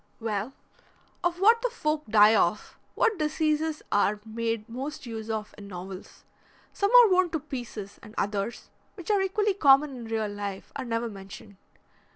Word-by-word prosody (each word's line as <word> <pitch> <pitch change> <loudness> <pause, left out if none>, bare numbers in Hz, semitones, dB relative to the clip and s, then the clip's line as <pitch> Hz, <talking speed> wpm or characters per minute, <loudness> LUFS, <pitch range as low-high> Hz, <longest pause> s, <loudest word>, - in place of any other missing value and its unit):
"Well, 225 +2 -3 0.7
of 350 0 0
what 450 +4 +5
the - - 0
folk 305 - -2
die 215 0 +6
of, 190 0 0
and - - -37
what 440 -4 +2
diseases 310 0 0
are 205 +1 +2
made 225 -1 -3
most 270 +5 -6
use 225 -2 -6
of 215 -1 -4
in 200 - -10
novels. 185 0 -9 0.5
Some 400 - +1
are 450 - +4
worn 365 -1 +4
to 320 -1 -2
pieces, 230 -7 -7
and 215 - -13
others, 205 +3 -3 0.2
which 360 +1 -4
are 405 -2 +3
equally 410 +2 +1
common 285 -5 +5
in 240 -2 -8
real 225 -1 -1
life, 205 -1 -6
are - - -4
never 230 0 -1
mentioned. 200 0 -11
230 Hz, 170 wpm, -27 LUFS, 210-315 Hz, 0.7 s, die